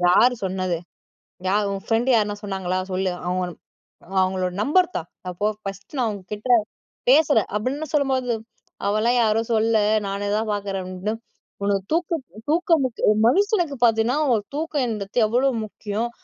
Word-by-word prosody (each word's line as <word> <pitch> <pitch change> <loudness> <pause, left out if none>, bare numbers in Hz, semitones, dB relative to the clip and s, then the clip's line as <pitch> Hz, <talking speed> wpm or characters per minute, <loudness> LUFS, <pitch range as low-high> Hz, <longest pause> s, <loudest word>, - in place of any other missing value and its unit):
யாரு 245 +7 +5
சொன்னது? 185 -2 -1 0.7
யார் 205 +2 +2
உன் 195 0 -4
ஃப்ரெண்ட் 235 +3 +2
யாருனா 210 -2 +1
சொன்னாங்களா? 190 -2 -2
சொல்லு. 185 0 0
அவங்க 180 +1 0 0.8
அவங்களோட 185 -1 0
நம்பர் 355 +7 +3
தா. - - -1 0.3
அப்போ 180 +4 -2 0.2
ஃபர்ஸ்ட்டு 195 +8 -7
நான் 240 -3 +1
உங்க 200 - -8
கிட்ட 210 +5 -8 0.6
பேசுறேன்'' 275 -7 +4
அப்டின்னு 275 +8 -2
சொல்லும்போது. 265 -4 +1 0.5
''அவலாம் 215 +4 +2
யாரும் 225 0 +2
சொல்லல 220 0 +3 0.3
நானே 200 +1 -3
தான் 220 0 -1
பார்க்குறேன்'' 195 -2 -3
அப்டின்னு, 190 +4 -3 0.5
உனக்கு 200 -1 +1
தூக்கம் 330 -2 0 0.3
தூக்கம் 330 -1 +3
முக்கிய 250 -3 -3
ஒரு 215 - +2
மனுஷனுக்கு 360 - +2
பார்த்தீன்னா 225 +3 +3 0.2
ஒரு 215 - 0
தூக்கம்ன்றது 250 -9 -1
எவ்வளோ 245 +5 +2 0.2
முக்கியம். 215 +2 -4
220 Hz, 140 wpm, -23 LUFS, 195-260 Hz, 0.8 s, யாரு